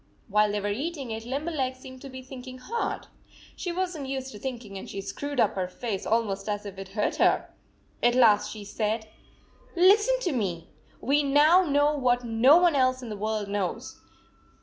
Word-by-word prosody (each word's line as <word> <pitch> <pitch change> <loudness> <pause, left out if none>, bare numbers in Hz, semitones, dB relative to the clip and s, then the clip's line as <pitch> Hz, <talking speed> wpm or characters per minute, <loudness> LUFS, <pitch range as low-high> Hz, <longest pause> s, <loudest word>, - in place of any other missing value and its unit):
While 210 0 +3
they 210 - -1
were 205 0 -2
eating 275 +2 -4
it, 220 +1 -5
Limberleg 275 -1 -2
seemed 260 0 -12
to 275 - -9
be 260 0 -9
thinking 255 -1 -9
hard. 460 - -3 0.5
She 355 - -4
was 365 0 -2
n 295 - -5
t - - -7
used 265 0 -4
to 210 - -10
thinking, 235 -6 -6
and 190 - -7
she 195 - -5
screwed 255 +8 -5
up 215 - +3
her 185 -2 -2
face 200 +1 -4
almost 210 -3 0
as 205 0 -3
if 195 -1 -8
it 195 0 -8
hurt 210 - 0
her. - - +2 0.5
At 240 0 +3
last 210 -4 +5
she 215 -2 -8
said: 220 +2 -2 0.4
" - - -30
Listen 420 +8 +5
to 355 - 0
me! 185 - -3 0.3
We 285 +4 +2
now 295 +5 +5
know 290 -3 +2
what 245 -3 +1
no 240 +6 +5
one 350 -2 +4
else 255 -1 +2
in 240 - -7
the 210 - -4
world 215 0 -2
knows. 200 -3 -4
250 Hz, 200 wpm, -27 LUFS, 210-285 Hz, 0.5 s, last